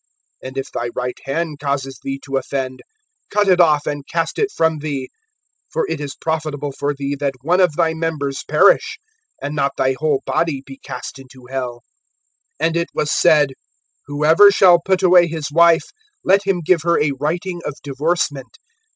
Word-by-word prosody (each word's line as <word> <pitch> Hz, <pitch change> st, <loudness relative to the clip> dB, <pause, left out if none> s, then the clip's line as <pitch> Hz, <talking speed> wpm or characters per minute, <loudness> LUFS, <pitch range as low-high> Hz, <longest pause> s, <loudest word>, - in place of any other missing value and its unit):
(30)And 130 Hz, +1 st, -8 dB
if 135 Hz, -, -4 dB
thy 120 Hz, -, -3 dB
right 125 Hz, 0 st, -3 dB
hand 150 Hz, +1 st, -3 dB
causes 140 Hz, -2 st, -3 dB
thee 135 Hz, 0 st, -4 dB
to 135 Hz, -, -4 dB
offend, 130 Hz, -1 st, -3 dB, 0.5 s
cut 205 Hz, 0 st, +1 dB
it 185 Hz, -2 st, +4 dB
off 150 Hz, -3 st, +3 dB
and 145 Hz, -1 st, -3 dB
cast 165 Hz, -1 st, -1 dB
it 420 Hz, -, +1 dB
from 160 Hz, -, +1 dB
thee; 140 Hz, -3 st, -4 dB, 0.6 s
for 485 Hz, -, -1 dB
it 150 Hz, -, -3 dB
is 140 Hz, -2 st, -5 dB
profitable 155 Hz, -3 st, -3 dB
for 145 Hz, +1 st, -2 dB
thee 140 Hz, 0 st, -3 dB
that 140 Hz, -1 st, -2 dB
one 175 Hz, +5 st, +2 dB
of 175 Hz, -5 st, +3 dB
thy 165 Hz, -1 st, +2 dB
members 155 Hz, -4 st, -3 dB
perish, 460 Hz, -2 st, +3 dB, 0.5 s
and 145 Hz, +1 st, -3 dB
not 140 Hz, -1 st, 0 dB
thy 130 Hz, 0 st, +1 dB
whole 150 Hz, -3 st, 0 dB
body 155 Hz, -5 st, -1 dB
be 135 Hz, 0 st, -11 dB
cast 125 Hz, +2 st, -7 dB
into 130 Hz, -1 st, -15 dB
hell. 125 Hz, -3 st, -4 dB, 0.8 s
(31)And 165 Hz, +2 st, +1 dB
it 170 Hz, -, -1 dB
was 150 Hz, -, 0 dB
said: 150 Hz, -5 st, +4 dB, 0.5 s
Whoever 155 Hz, +7 st, +6 dB
shall 180 Hz, -3 st, +5 dB
put 190 Hz, 0 st, +1 dB
away 180 Hz, -1 st, +6 dB
his 155 Hz, -3 st, -5 dB
wife, 170 Hz, +1 st, +4 dB, 0.3 s
let 195 Hz, +1 st, +3 dB
him 190 Hz, -3 st, +1 dB
give 170 Hz, 0 st, +2 dB
her 170 Hz, +1 st, +2 dB
a 145 Hz, -1 st, +1 dB
writing 175 Hz, +4 st, -2 dB
of 150 Hz, -, -4 dB
divorcement. 145 Hz, -1 st, -2 dB
150 Hz, 175 wpm, -19 LUFS, 140-170 Hz, 0.8 s, Whoever